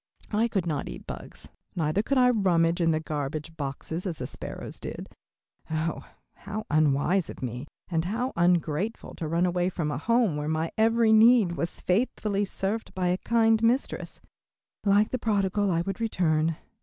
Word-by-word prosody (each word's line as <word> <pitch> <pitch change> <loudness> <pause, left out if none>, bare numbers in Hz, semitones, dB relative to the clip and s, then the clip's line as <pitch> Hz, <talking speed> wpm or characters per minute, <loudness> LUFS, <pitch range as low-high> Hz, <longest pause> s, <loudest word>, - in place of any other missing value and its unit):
I 220 +2 +2
could 195 -6 -1
not 150 -4 -2
eat - - -9
bugs, - - -9 0.3
neither 160 +3 +1
could 275 +5 0
I 250 -1 +6
rummage 175 -6 +2
in 165 - +3
the 155 -1 +2
garbage 155 +1 -4
boxes 160 +5 -4
as 170 -4 -3
the - - -4
sparrows - - -7
did. - - -6 0.6
Oh, 160 0 -2 0.3
how 215 +2 -6
unwise 155 +4 +2
of - - -8
me, 125 +3 -4 0.2
and 165 -2 -1
how 240 +7 -2
ungrateful 175 +4 0
to 160 - -3
run 170 +3 +1
away 180 0 +1
from 165 -5 -2
a 145 - -3
home 230 -4 +2
where 150 0 -3
my 160 +1 -1
every 225 0 +4
need 220 -3 +6
was 170 0 -4
faithfully 205 0 0
served 200 +3 -3
by 180 -1 0
a 180 +1 0
kind 225 -1 +3
mistress. 240 +4 0 0.6
Like 205 +1 +3
the 255 - -1
prodigal 205 -2 +1
I 170 -2 +1
would 195 +4 -4
return. 165 -7 +1
180 Hz, 170 wpm, -27 LUFS, 160-220 Hz, 0.6 s, I